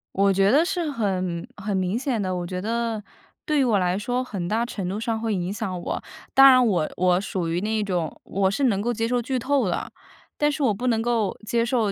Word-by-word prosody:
我 195 0 +3
觉 195 +1 +3
得 290 +6 +5
是 345 -4 -1
很 185 -8 -2
很 205 0 -3
明 185 +3 0
显 250 -3 -1
的。 185 -2 -1
我 175 -1 -3
觉 180 +1 -4
得， 230 +1 -2 0.4
对 300 -1 +1
于 - - +4
我 225 -6 +3
来 180 0 +1
说 245 +5 -1
很 195 -8 -5
大 225 +5 0
程 200 -6 -5
度 200 +3 -3
上 225 0 -2
会 225 -1 -1
影 180 0 -2
响 195 -4 -4
我。 - - -4 0.3
当 270 0 +9
然 255 -1 +6
我 175 -9 +1
我 180 0 +3
属 185 -3 -3
于 170 +2 -1
那 215 +1 0
种 175 -6 -2
我 190 0 +1
是 270 +8 0
能 200 -6 +2
够 240 +3 0
接 225 0 -1
受 245 0 +1
剧 255 +2 -2
透 265 -2 +1
了。 175 - -3 0.5
但 295 0 +2
是 290 0 -2
我 235 -5 +3
不 240 +6 -3
能 225 -2 +2
够 225 -4 0
接 230 +2 +1
受， 235 -3 +1
215 Hz, 255 characters per minute, -24 LUFS, 190-240 Hz, 0.5 s, 当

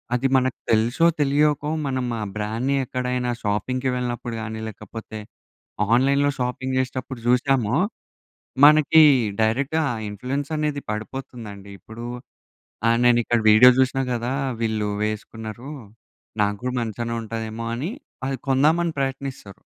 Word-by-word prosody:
అది 135 +2 +1
మనకు 130 -1 0
తెలుసో, 120 +9 +3 0.2
తెలియకో, 145 +1 +2 0.2
మనం 130 -2 -1 0.2
ఆ - - -1
బ్రాండ్‌‌ని 115 +6 -1
ఎక్కడైనా 125 0 -2
షాపింగ్‌కి 125 +6 -1
వెళ్ళినప్పుడు 120 -1 -3
గానీ, 110 0 -5
లేకపోతే 110 +1 -9 0.8
ఆన్‌లైన్‌లో 140 +3 +3
షాపింగ్ 130 +1 -2
చేసేటప్పుడు 130 -1 -4
చూసామో, 125 -1 +2 0.9
మనకి 155 +1 +6 0.4
డైరెక్ట్‌గా 140 +8 +1 0.2
ఇన్ఫ్లుయెన్స్ 130 +8 -4
అనేది 150 -2 -1
పడిపోతుందండి. 105 -3 -7
ఇప్పుడు 115 +2 -9 0.8
ఆహ్, 115 0 +3
నేను 120 -1 +5
ఇక్కడ 120 -1 +1
వీడియో 125 +4 +9
చూసినా 130 +1 +2
గదా! 120 +2 -2 0.3
వీళ్ళు 110 -2 0 0.2
వేసుకున్నారు. 110 +4 -6 0.7
నాక్కూడా 105 +5 -1
మంచిగానే 115 +1 -3
ఉంటాదేమో! 110 0 -5
అని 155 - -3 0.4
అది 135 -1 -2
కొందామని 160 +5 +3
ప్రయత్నిస్తారు. 135 -6 -4
125 Hz, 110 wpm, -23 LUFS, 110-135 Hz, 0.9 s, వీడియో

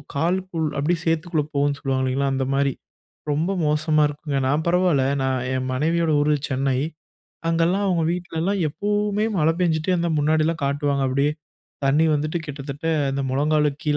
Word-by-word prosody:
காலுக்குள் 170 +1 0
அப்டியே 165 +4 +1
சேத்துக்குள்ள 165 -1 0
போகும்னு 140 0 +1
சொல்லுவாங்க 130 -1 -1
இல்லங்களா? 135 +1 0
அந்த 135 0 0
மாரி 140 -1 +1 0.6
ரொம்ப 160 +6 0
மோசமா 155 +1 +2
இருக்குங்க. 145 -1 -3
நான் 150 +4 0
பரவால, 180 -5 +3 0.2
நான் 130 -1 0
என் 130 0 -2
மனைவியோட 165 +4 +1
ஊரு 150 0 +3
சென்னை. 130 0 0 0.7
அங்கலாம், 170 +4 +2
அவங்க 170 -4 +1
வீட்ல 175 -2 -4
எல்லாம் 195 +1 0
எப்பவுமே 205 +4 -1
மழை 160 0 +3
பேஞ்சுட்டே 165 0 +1
இருந்தா 170 -1 0
முன்னாடிலாம் 155 +1 +1
காட்டுவாங்க, 140 0 0
அப்டீயே 140 +3 +1 0.5
தண்ணீ 150 +4 +3
வந்துட்டு 155 +3 -1
கிட்டத்தட்ட 140 0 -7 0.3
இந்த 140 0 -1
முழங்கால 150 +2 +2
கீழ 150 -1 +2
150 Hz, 150 wpm, -23 LUFS, 140-170 Hz, 0.7 s, பரவால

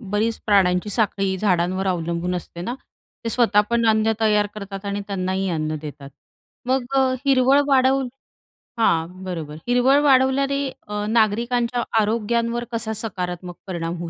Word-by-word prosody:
बरीच 215 +1 -1
प्राण्यांची 195 -1 +3
साखळी 195 -3 0
झाडांवर 185 -1 +1
अवलंबून 170 0 -1
असते 170 -1 -7
ना, 240 +6 -3 0.5
ते - - -1
स्वतः 225 -4 +3
पण 235 -1 +2
अन्न 220 0 +3
तयार 210 -1 +3
करतात 200 -1 -7
आणि 200 0 -2
त्यांनाही 190 -1 -2
अन्न 155 -2 -2
देतात, 145 -2 -9 0.6
मग 260 -1 +1
अ, 260 -1 +3
हिरवळ 270 +1 +4
वाढवून 265 -1 +3 0.7
हां, 180 -2 +1
बरोबर. 160 -5 -5
हिरवळ 250 +3 +4
वाढवल्याने 275 +1 +3 0.2
अ, 210 0 -3
नागरिकांच्या 235 +2 +1 0.2
आरोग्यांवर 235 +2 0
कसा 225 -1 -2
सकारात्मक 180 -5 -5
परिणाम 170 -1 -3
होऊ 170 -1 -5
210 Hz, 135 wpm, -22 LUFS, 180-240 Hz, 0.7 s, हिरवळ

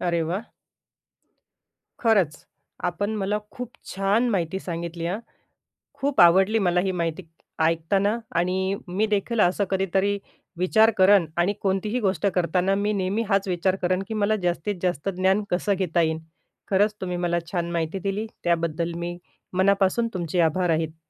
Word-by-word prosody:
अरे 170 -2 0
वाह! 200 +6 -3 1.5
खरंच. 195 -10 +2 0.4
आपण 180 +4 -1
मला 205 +1 0
खूप 250 -2 -6 0.3
छान 200 +5 +2
माहिती 190 -2 -1
सांगितली 170 -1 -4
हां. 190 +5 -2 0.8
खूप 280 -5 +1
आवडली 190 +6 +5
मला 175 0 +3
ही 190 - 0
माहिती 170 0 -2 0.4
ऐकताना 195 +7 +2 0.2
आणि 190 +2 0
मी 195 +5 0
देखील 215 +3 0
असं 185 +2 +3
कधीतरी 195 +1 +1 0.4
विचार 220 +5 +4
करेन 190 -1 +6
आणि 180 +4 +2
कोणतीही 200 +5 0
गोष्ट 200 -1 0
करताना 180 +2 +1
मी 205 +1 0
नेहमी 195 +3 0
हाच 195 0 +2
विचार 185 +1 +1
करेन 185 +1 +1
की - - -4
मला 215 0 +1
जास्तीत 175 +3 -1
जास्त 180 0 -1
ज्ञान 190 +3 +2
कसं 195 +3 +1
घेता 175 -3 +1
येईल? 160 -1 +1 0.5
खरंच 205 +2 +3
तुम्ही 180 -1 -2
मला 175 -1 0
छान 170 -2 -2
माहिती 170 +2 -2
दिली 200 +3 -2 0.2
त्याबद्दल 170 0 0
मी 175 0 -4 0.4
मनापासून 195 +4 +2
तुमचे 175 -1 -2
आभार 170 +2 +1
आहेत. 160 0 -2
185 Hz, 150 wpm, -24 LUFS, 170-200 Hz, 1.5 s, करेन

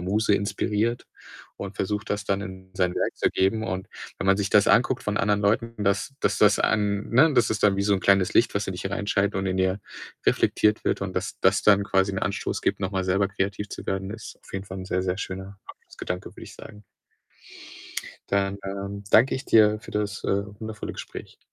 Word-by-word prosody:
Muse 105 +4 +1
inspiriert 105 +3 -1 0.5
und 100 0 -7
versucht, 105 +2 -2
das 105 -1 -2
dann 100 -1 0
in 95 -2 -9
sein 90 -2 0
Werk - - -1
zu - - +2
geben 100 +4 +1
und 95 -3 -4 0.3
wenn - - -3
man 95 0 +5
sich 100 -1 0
das 105 0 +4
anguckt 125 +2 +3
von 105 0 -2
anderen 105 0 +2
Leuten, 115 +1 0
dass 100 +8 0
dass - - +1
das 105 -1 +5
an 105 -1 0
ne, 150 +7 +5
das 120 -3 +3
ist 110 -1 -1
dann 100 -2 +4
wie 100 - 0
so 100 0 +2
'n 95 - +1
kleines 100 -1 +3
Licht, 115 - +3
was 100 0 -1
in 95 - -3
dich 90 - -7
hereinscheint 100 +1 0
und 95 - -1
in 95 0 -1
dir 95 +2 +1 0.4
reflektiert 105 0 +2
wird - - 0
und, - - -4
dass - - -3
das 95 +1 +3
dann 100 -1 +5
quasi 95 0 +1
'n 95 - -2
Anstoß 95 - -2
gibt, - - 0
noch 95 -2 -1
mal 95 -2 -1
selber 95 +2 +1
kreativ 100 +1 -3
zu - - -8
werden, 95 0 -2
ist 110 +1 -9
auf - - -17
jeden 95 0 -4
Fall 95 -1 -7
'n 95 - -6
sehr, 95 -1 0
sehr 95 0 -2
schöner 95 +1 -6
Abschlussgedanke, 90 0 -7
würd - - -12
ich - - -12
sagen. 105 0 -12 1.5
Dann, 100 0 0
ähm, 100 +1 -5
danke 130 +4 +5
ich 130 - -4
dir 105 -1 +5
für - - -12
das, 105 -1 -2
äh, 100 +1 +1 0.2
wundervolle 110 -2 -6
Gespräch. - - -9
100 Hz, 215 wpm, -25 LUFS, 95-105 Hz, 1.5 s, man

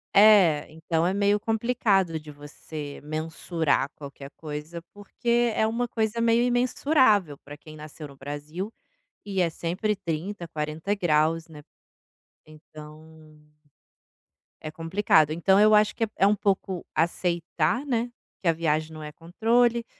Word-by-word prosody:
É, 195 -8 +6
então 160 +1 -1
é 185 - +1
meio 205 +1 +2
complicado 215 -7 +1
de 150 0 -11
você 145 0 -9
mensurar 155 0 -1
qualquer 140 -1 -10
coisa, 155 +2 -7
porque 235 +3 0
é 220 - +2
uma 240 +2 -1
coisa 220 -1 -2
meio 230 0 +3
imensurável, 245 - +2
para 145 +1 -12
quem 155 +1 -13
nasceu 150 0 -9
no 140 -1 -16
Brasil, 150 +9 -6 0.5
e 195 -2 -1
é 170 - +2
sempre 185 +6 -2
30, 175 +1 -5
40ºC, 160 +1 0
né, 150 -2 -13 0.8
então 155 0 -15 1.1
é 155 - -5
complicado. 165 -2 +2
Então 190 +5 +3
eu 215 +1 +6
acho 210 0 +3
que 225 - -1
é - - -13
é 195 - +5
um 210 - +3
pouco 190 -2 -1
aceitar, 170 - 0
né, 240 -2 -1 0.3
que 180 - -3
a - - +4
viagem 160 -1 -1
não 155 - -9
é 150 - -7
controle, 230 +8 +1
170 Hz, 140 wpm, -26 LUFS, 155-210 Hz, 1.1 s, É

